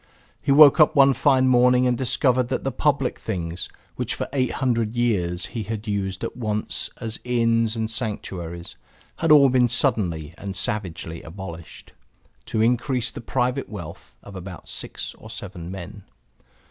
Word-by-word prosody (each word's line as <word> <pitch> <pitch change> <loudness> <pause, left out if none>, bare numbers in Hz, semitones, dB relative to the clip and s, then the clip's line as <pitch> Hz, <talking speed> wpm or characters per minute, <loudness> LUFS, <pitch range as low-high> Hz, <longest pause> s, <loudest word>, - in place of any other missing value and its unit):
He - - 0
woke 145 +1 +8
up 155 - +5
one 135 -1 +6
fine 130 0 +3
morning 125 0 +5
and 125 -1 +2
discovered 125 0 +1
that - - -2
the 135 - -1
public 140 -3 0
things, 90 -4 -4 0.3
which - - -2
for - - -3
eight 130 -3 0
hundred 115 -4 0
years 95 -7 0
he 115 - -2
had 110 +1 -5
used 95 -2 -2
at - - -4
once 110 -3 -3
as 115 0 -4
inns 115 -2 +1
and 110 -1 -1
sanctuaries, 90 -7 -4 0.4
had 165 -1 +1
all 140 -3 +8
been 125 -1 +3
suddenly 95 - 0
and 100 -1 -5
savagely 90 -5 -3
abolished, 85 -2 -9 0.5
to 110 - 0
increase 125 +1 +1
the - - -8
private 125 +3 -1
wealth 85 -6 -9
of 100 - -11
about 90 -3 -9
six - - -5
or 110 - -12
seven 100 -6 -7
men. 95 +2 -8
115 Hz, 160 wpm, -23 LUFS, 95-125 Hz, 0.5 s, woke